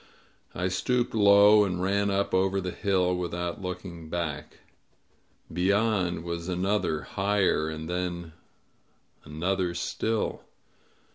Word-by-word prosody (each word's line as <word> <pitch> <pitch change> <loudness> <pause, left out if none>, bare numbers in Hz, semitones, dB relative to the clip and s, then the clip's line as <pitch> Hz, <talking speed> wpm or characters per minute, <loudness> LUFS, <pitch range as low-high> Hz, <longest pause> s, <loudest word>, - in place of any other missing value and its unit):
I 90 +2 -1
stooped 120 +6 0
low 105 0 +6
and 90 -3 -2
ran 100 +2 +1
up 100 0 0
over 95 +1 +2
the 90 -1 -3
hill, 90 -2 +1
without 90 +1 -3
looking 90 -3 -7
back. 80 -3 -4 0.9
Beyond 95 -1 +1
was 85 0 -4
another, 90 -4 0
higher, 95 -5 +1
and 80 0 -6
then 85 -2 -3 0.9
another 90 +3 -1
still. 110 +5 -2
90 Hz, 110 wpm, -27 LUFS, 85-100 Hz, 0.9 s, low